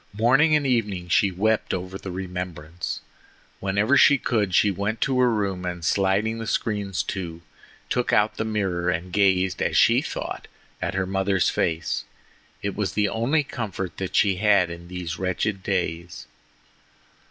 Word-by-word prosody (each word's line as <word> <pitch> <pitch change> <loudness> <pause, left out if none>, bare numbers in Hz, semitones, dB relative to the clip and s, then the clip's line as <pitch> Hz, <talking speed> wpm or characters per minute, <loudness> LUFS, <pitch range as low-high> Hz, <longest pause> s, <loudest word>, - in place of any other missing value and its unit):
Morning 135 +9 +4
and 150 -2 +1
evening 105 -8 0
she 100 +4 +4
wept 110 +4 0
over 90 +1 -6
the 95 - -6
remembrance. 90 -3 -5 0.6
Whenever 100 +7 +2
she 145 - +7
could 105 -8 0
she 105 - +4
went 100 +4 -2
to 130 -2 +1
her 125 -1 +5
room, 100 -4 -1
and 90 -2 -4
sliding 100 +5 +1
the 115 - -5
screens 100 -5 -1
to, 85 -4 -5 0.4
took 125 -1 0
out 105 +1 +2
the - - 0
mirror 95 -5 -1
and 85 +1 -3
gazed, 95 -2 +2
as - - +1
she - - +5
thought, - - -5 0.3
at 95 - -2
her 95 -1 0
mother's 95 0 +1
face. 80 -8 -1 0.6
It - - -2
was - - -2
the 105 -1 +1
only 130 +9 +1
comfort 100 -8 -5
that 95 -1 -4
she 100 -3 +3
had 100 -4 +3
in 85 0 -9
these 90 -3 -5
wretched 95 +2 -1
days. 90 -3 -3
95 Hz, 160 wpm, -24 LUFS, 90-110 Hz, 0.6 s, she